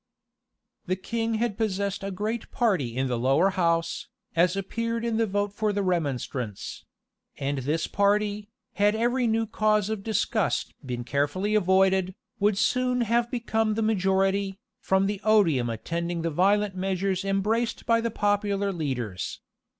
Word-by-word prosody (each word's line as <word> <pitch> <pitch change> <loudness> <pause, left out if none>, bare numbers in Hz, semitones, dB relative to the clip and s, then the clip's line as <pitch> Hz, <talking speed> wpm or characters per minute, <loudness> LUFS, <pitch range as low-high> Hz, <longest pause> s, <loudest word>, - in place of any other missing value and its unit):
[*] - - -55
The 185 - +1
king 225 +4 -2
had 220 -2 -1
possessed 200 -2 -1
a 195 - -2
great 215 +4 -3
party 180 - 0
in 130 - +1
the 125 -2 -1
lower 140 +10 +3
house, 170 -3 0 0.3
as 175 +2 +3
appeared 230 +4 -2
in 230 -1 0
the 225 -1 +2
vote 205 0 -1
for 215 0 0
the 200 0 -1
remonstrance; 135 - -3 0.5
and 140 0 -2
this 150 +5 -1
party, 205 +1 +1 0.2
had 205 +1 +3
every 240 +2 +1
new 225 0 +1
cause 215 -1 +1
of 220 -2 -3
disgust 215 -1 0
been 125 -2 -4
carefully 145 - 0
avoided, 190 -1 +3 0.2
would 205 0 +2
soon 250 +3 +1
have 235 +1 +1
become 225 -3 0
the 225 - 0
majority, 195 -1 +1 0.2
from 190 0 +2
the 200 0 -2
odium 170 - +3
attending 170 +9 -3
the 165 - -1
violent 200 +4 +2
measures 190 0 -1
embraced 210 +4 0
by 230 0 +3
the 230 - -1
popular 205 -1 0
leaders. 125 - -3
195 Hz, 150 wpm, -26 LUFS, 175-215 Hz, 0.5 s, lower